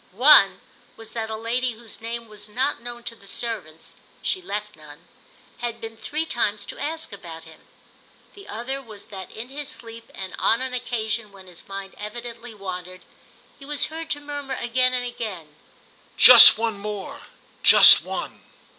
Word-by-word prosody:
One 200 Hz, -5 st, +6 dB, 0.4 s
was 225 Hz, -1 st, -12 dB
that 225 Hz, -1 st, -4 dB
a 220 Hz, -, -4 dB
lady 240 Hz, +3 st, -2 dB
whose 225 Hz, -1 st, -11 dB
name 230 Hz, 0 st, -6 dB
was 210 Hz, -1 st, -13 dB
not 255 Hz, +4 st, -1 dB
known 240 Hz, 0 st, -8 dB
to 230 Hz, -, -5 dB
the 200 Hz, -3 st, -18 dB
servants 195 Hz, -9 st, -7 dB, 0.3 s
(she 375 Hz, -, -1 dB
left 210 Hz, -, -5 dB
none) 150 Hz, -1 st, -15 dB, 0.5 s
had 235 Hz, -1 st, -4 dB
been 225 Hz, -1 st, -8 dB
three 305 Hz, +7 st, -3 dB
times 215 Hz, -8 st, -1 dB
to -, -, -10 dB
ask 315 Hz, -3 st, -4 dB
about 165 Hz, -4 st, -10 dB
him; 160 Hz, -1 st, -16 dB, 0.7 s
the 400 Hz, -1 st, -14 dB
other 260 Hz, +5 st, -5 dB
was 215 Hz, -5 st, -11 dB
that 190 Hz, -2 st, -8 dB
in 230 Hz, +3 st, -8 dB
his 285 Hz, +1 st, -5 dB
sleep 230 Hz, 0 st, -7 dB
and 190 Hz, -1 st, -7 dB
on 225 Hz, -, +3 dB
an 260 Hz, 0 st, -4 dB
occasion 230 Hz, -3 st, -3 dB
when 195 Hz, -1 st, -15 dB
his 180 Hz, -2 st, -12 dB
mind 195 Hz, 0 st, -7 dB
evidently 235 Hz, +2 st, -8 dB
wandered 185 Hz, -2 st, -7 dB, 0.6 s
he -, -, -13 dB
was 295 Hz, 0 st, 0 dB
heard 325 Hz, 0 st, -6 dB
to 290 Hz, -, -2 dB
murmur 290 Hz, -2 st, -6 dB
again 255 Hz, +1 st, +1 dB
and 245 Hz, 0 st, -2 dB
again: 190 Hz, -11 st, -7 dB, 0.6 s
"Just 245 Hz, -4 st, +11 dB
one 225 Hz, -2 st, -2 dB
more—just 205 Hz, -1 st, +4 dB
one." -, -, -6 dB
225 Hz, 165 wpm, -23 LUFS, 200-250 Hz, 0.7 s, Just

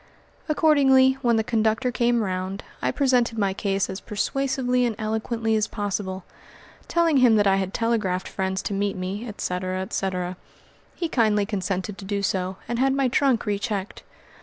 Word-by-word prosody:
Accordingly, 270 Hz, -4 st, +4 dB
when 240 Hz, -3 st, +3 dB
the 220 Hz, -, +2 dB
conductor 225 Hz, +3 st, +1 dB
came 235 Hz, -1 st, +1 dB
round, 185 Hz, +1 st, -3 dB, 0.2 s
I -, -, +1 dB
presented 250 Hz, -4 st, +1 dB
my 200 Hz, -3 st, +1 dB
case 195 Hz, -1 st, -1 dB
as 190 Hz, +1 st, -6 dB
persuasively 250 Hz, +3 st, 0 dB
and 235 Hz, -3 st, 0 dB
eloquently 220 Hz, +1 st, -1 dB
as 215 Hz, 0 st, +1 dB
possible, 195 Hz, -3 st, -3 dB, 0.6 s
telling 335 Hz, -3 st, +2 dB
him 250 Hz, -4 st, +6 dB
that 205 Hz, -1 st, +3 dB
I 195 Hz, -1 st, +4 dB
had 190 Hz, -1 st, -2 dB
telegraphed 210 Hz, -5 st, 0 dB
friends 190 Hz, 0 st, -2 dB
to -, -, -3 dB
meet 200 Hz, 0 st, -1 dB
me, 195 Hz, +6 st, -4 dB
etc., 185 Hz, -3 st, -3 dB
etc. 185 Hz, -1 st, -3 dB, 0.6 s
He 340 Hz, -, -2 dB
kindly 215 Hz, -8 st, +2 dB
consented 195 Hz, -1 st, -3 dB
to 195 Hz, -, -8 dB
do 200 Hz, 0 st, -2 dB
so 190 Hz, -1 st, -1 dB
and 240 Hz, 0 st, -2 dB
had 270 Hz, +1 st, +3 dB
my 270 Hz, -2 st, +2 dB
trunk 260 Hz, -2 st, +2 dB
re 205 Hz, -2 st, -1 dB
checked. 205 Hz, -2 st, -4 dB
215 Hz, 165 wpm, -24 LUFS, 195-245 Hz, 0.6 s, him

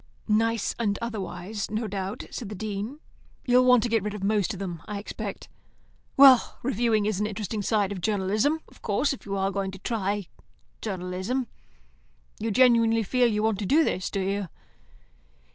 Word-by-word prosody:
"Nice 225 Hz, 0 st, +1 dB
and 205 Hz, -3 st, 0 dB
otherwise, 205 Hz, -2 st, -4 dB
no 220 Hz, +2 st, -2 dB
doubt," 195 Hz, 0 st, -4 dB
said 225 Hz, -, -6 dB
the 210 Hz, -, -6 dB
Dean. 215 Hz, +7 st, -4 dB, 0.5 s
"You'll 250 Hz, 0 st, +5 dB
want 250 Hz, -2 st, +6 dB
to 240 Hz, -, 0 dB
get 225 Hz, -1 st, +2 dB
rid 210 Hz, +1 st, -4 dB
of 200 Hz, -, -6 dB
most 205 Hz, 0 st, +1 dB
of 200 Hz, -, -5 dB
them, 175 Hz, -4 st, -5 dB
I 210 Hz, -1 st, -4 dB
expect. 200 Hz, -, -6 dB, 0.7 s
Well, 265 Hz, -3 st, +7 dB
reviewing 230 Hz, -4 st, +1 dB
is 210 Hz, -2 st, 0 dB
an 210 Hz, -, 0 dB
interesting 210 Hz, 0 st, -4 dB
side 205 Hz, -1 st, +1 dB
of 190 Hz, -3 st, -5 dB
journalism, 215 Hz, -, +1 dB
of -, -, -20 dB
course, 220 Hz, +8 st, +1 dB
if 265 Hz, -, -11 dB
you 200 Hz, 0 st, -2 dB
are 195 Hz, 0 st, 0 dB
going 195 Hz, 0 st, -2 dB
to 190 Hz, -, -8 dB
try 205 Hz, -1 st, -2 dB, 0.6 s
journalism. 190 Hz, +5 st, -2 dB, 0.9 s
You 225 Hz, -, -2 dB
genuinely 230 Hz, -1 st, +4 dB
feel 245 Hz, +4 st, +2 dB
you 210 Hz, -2 st, 0 dB
want 220 Hz, -3 st, +1 dB
to 205 Hz, -, -2 dB
do 315 Hz, -, +5 dB
this, 185 Hz, -10 st, -1 dB
do 195 Hz, -, -2 dB
you?" 195 Hz, 0 st, -1 dB
210 Hz, 180 wpm, -26 LUFS, 195-230 Hz, 0.9 s, Well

